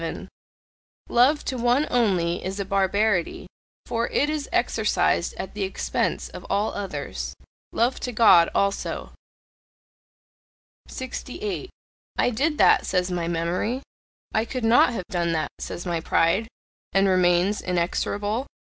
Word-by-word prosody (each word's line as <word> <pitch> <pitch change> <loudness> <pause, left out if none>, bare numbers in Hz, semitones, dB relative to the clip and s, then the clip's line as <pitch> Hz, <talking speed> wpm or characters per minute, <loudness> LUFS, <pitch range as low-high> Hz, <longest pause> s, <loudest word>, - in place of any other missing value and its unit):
Love 265 +5 +3
to 255 - -2
one 245 +5 +3
only 185 -8 +1
is 190 +2 -4
a 200 - -2
barbarity, 195 -1 +1 0.4
for 230 0 -1
it 295 +2 +1
is 305 -2 -3
exercised - - +1
at - - -6
the - - -5
expense 385 - -1
of - - -9
all 210 +2 0
others. 200 -2 -5 0.4
Love 240 +3 +1
to 250 - -4
God 210 -7 +6
also! 200 0 -1 1.7
68. 255 - -5 0.5
"I - - +2
did 295 +7 0
that," - - +5
says 180 -1 0
my 175 -2 -2
memory. 175 +10 -1 0.5
"I 220 - +2
could 245 0 -4
not 230 +2 +5
have 205 -6 -4
done 170 -2 0
that," 160 - -1
says 175 - -6
my 170 -2 -1
pride, 165 +7 +2 0.5
and 195 0 +4
remains 185 +2 +3
inexorable. 205 +6 -1
205 Hz, 130 wpm, -24 LUFS, 180-245 Hz, 1.7 s, God